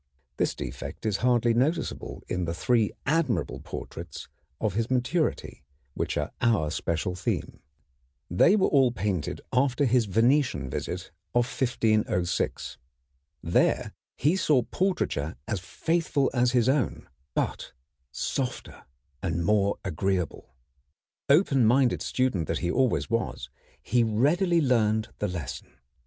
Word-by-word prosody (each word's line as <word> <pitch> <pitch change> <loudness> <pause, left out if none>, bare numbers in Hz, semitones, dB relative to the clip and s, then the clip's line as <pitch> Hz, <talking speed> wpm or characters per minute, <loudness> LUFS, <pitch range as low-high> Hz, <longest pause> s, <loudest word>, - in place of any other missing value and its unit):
This - - 0
defect - - -7
is 105 -2 +1
hardly 120 -1 +3
noticeable 135 +9 -1
in 90 -1 -2
the 85 0 -3
three 115 +2 +2
admirable 135 - 0
portraits 85 -2 -8 0.3
of 110 -4 0
his 115 +3 -1
maturity, 130 +6 -1 0.3
which - - -2
are - - -2
our 105 -11 +2
special 85 +2 -1
theme. 90 0 -3 0.7
They 130 - +4
were 200 - +3
all 135 -4 +4
painted 100 -9 -2
after 135 +2 +2
his 125 -2 +3
Venetian 115 - +2
visit - - -4 0.2
of 120 0 +4
1506. 110 -8 0 0.6
There - - +1 0.2
he 155 +6 +2
saw 150 -9 +3
portraiture 180 - -1
as 100 - -1
faithful 155 - 0
as 125 -1 +2
his 120 -2 +3
own, 135 -1 0 0.3
but - - -2 0.4
softer 125 - -4 0.4
and 85 -2 -1
more 100 0 +2
agreeable. 90 -6 -2 0.7
Open 140 -4 +4
minded 125 +3 +3
student 125 - 0
that - - -1
he 85 - +1
always 130 +1 +1
was, 110 - -2 0.3
he 120 +7 +2
readily 160 - +2
learned 110 -5 +2
the 105 - 0
lesson. 85 -9 -6
120 Hz, 125 wpm, -27 LUFS, 95-135 Hz, 0.7 s, They